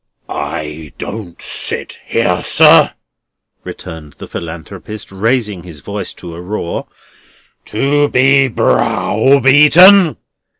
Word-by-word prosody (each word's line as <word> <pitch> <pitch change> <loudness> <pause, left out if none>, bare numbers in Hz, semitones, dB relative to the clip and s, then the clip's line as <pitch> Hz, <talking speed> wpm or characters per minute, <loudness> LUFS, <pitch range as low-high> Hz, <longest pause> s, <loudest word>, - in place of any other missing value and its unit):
"I 75 -1 -6
don't 100 -6 -8
sit - - -5
here, - - 0
sir," - - +5 0.7
returned 75 -3 -10
the - - -11
Philanthropist, 90 +6 -9
raising 105 -1 -1
his 85 -5 -12
voice 100 -2 -5
to 85 -2 -10
a 85 - -9
roar, 90 -2 -5 0.8
"to 145 +6 0
be 135 +1 +3
browbeaten." 145 - +4
105 Hz, 95 wpm, -14 LUFS, 85-135 Hz, 0.8 s, sir